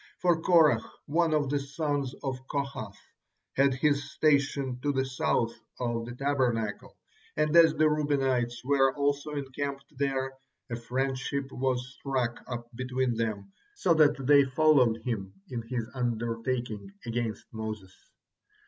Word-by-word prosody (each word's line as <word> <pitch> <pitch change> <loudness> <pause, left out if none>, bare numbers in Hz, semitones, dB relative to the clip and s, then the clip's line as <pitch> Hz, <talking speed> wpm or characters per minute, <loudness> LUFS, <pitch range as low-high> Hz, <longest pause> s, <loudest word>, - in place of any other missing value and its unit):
For 175 -3 +2
Korah, 160 -10 +5 0.2
one 165 +2 +2
of 145 -3 +1
the 145 - +2
sons 145 -2 -2
of 130 -2 -2
Kohath, 140 -8 -4 0.6
had 135 -1 +4
his 145 +1 +1
station 140 -4 +1
to 145 - +1
the 135 -1 0
south 120 -3 0 0.3
of 120 -2 -2
the 120 - -7
Tabernacle, 125 -6 -1 0.4
and 155 +1 +2
as 165 -2 +7
the 155 - +4
Reubenites 135 -5 0
were 135 -1 +3
also 145 +1 0
encamped 140 0 -4
there, 135 -1 -1 0.4
a - - -1
friendship 135 +3 -2
was 125 -1 -1
struck 125 -4 -2
up 120 -1 -5
between 130 0 -1
them, 110 -4 -3 0.2
so 180 - +3
that 150 -2 +5
they 140 +1 +7
followed 130 -5 +3
him 100 -6 -3 0.2
in 120 -2 -2
his 115 -1 -4
undertaking 120 -3 -2 0.2
against 115 -2 -3
Moses. 110 -4 -6
130 Hz, 135 wpm, -29 LUFS, 120-145 Hz, 0.6 s, as